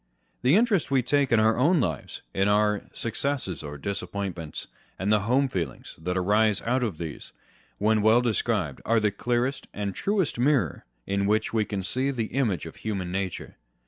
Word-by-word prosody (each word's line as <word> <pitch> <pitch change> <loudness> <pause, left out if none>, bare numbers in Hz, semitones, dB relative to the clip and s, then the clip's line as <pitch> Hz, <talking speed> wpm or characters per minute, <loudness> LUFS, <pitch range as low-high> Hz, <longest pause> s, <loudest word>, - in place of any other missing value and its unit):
The 130 +6 +4
interest 210 - +3
we 135 -2 +2
take 140 +1 +2
in 115 - +5
our 110 +1 +4
own 155 +8 +4
lives, 80 - -3
in 95 +1 +2
our 105 0 +2
successes 115 - -2
or 75 -1 -7
disappointments, 95 -2 -4 0.3
and 95 +3 0
the 105 - +4
Aowe 125 +7 +2
feelings 90 -9 -4
that 90 +2 -1
arise 105 +3 +3
out 125 +2 +1
of 110 -10 -2
these, 80 -3 -7 0.4
when 110 +1 +2
well 110 +3 +5
described, 110 - -1
are 115 0 +3
the 105 -1 +2
clearest 120 +6 -1
and 100 -1 -2
truest 195 - 0
mirror 125 - +1 0.2
in 100 0 0
which 110 +2 +1
we 110 -2 +2
can 100 -2 -3
see 130 +8 0
the 115 -6 -3
image 120 -11 0
of 80 - -9
human 95 -5 -3
nature. 95 -1 -4
110 Hz, 175 wpm, -26 LUFS, 95-125 Hz, 0.4 s, in